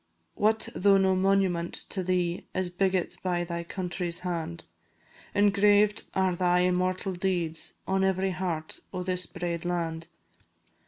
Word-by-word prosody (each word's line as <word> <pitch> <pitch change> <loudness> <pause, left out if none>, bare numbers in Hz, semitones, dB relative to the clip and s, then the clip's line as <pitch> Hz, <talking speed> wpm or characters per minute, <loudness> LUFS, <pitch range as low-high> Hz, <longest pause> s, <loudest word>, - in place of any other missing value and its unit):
What 220 +1 +1
though 200 +1 +4
no 190 -1 +3
monument 185 -3 +1
to 190 - 0
thee 180 -1 -1
Is 185 -1 -1
biggit 185 0 0
by 175 -2 0
thy 170 0 -4
country's 175 -1 -3
hand; 170 -2 -4 0.7
Engraved 205 +1 +4
are 190 -1 +2
thy 180 0 +3
immortal 185 +1 0
deeds 175 -3 -2
On 190 0 +1
every 190 0 +1
heart 175 -4 -3
o' 185 -1 -3
this 180 -1 +1
braid 170 -1 -4
land. 165 -2 -2
180 Hz, 130 wpm, -28 LUFS, 175-190 Hz, 0.7 s, though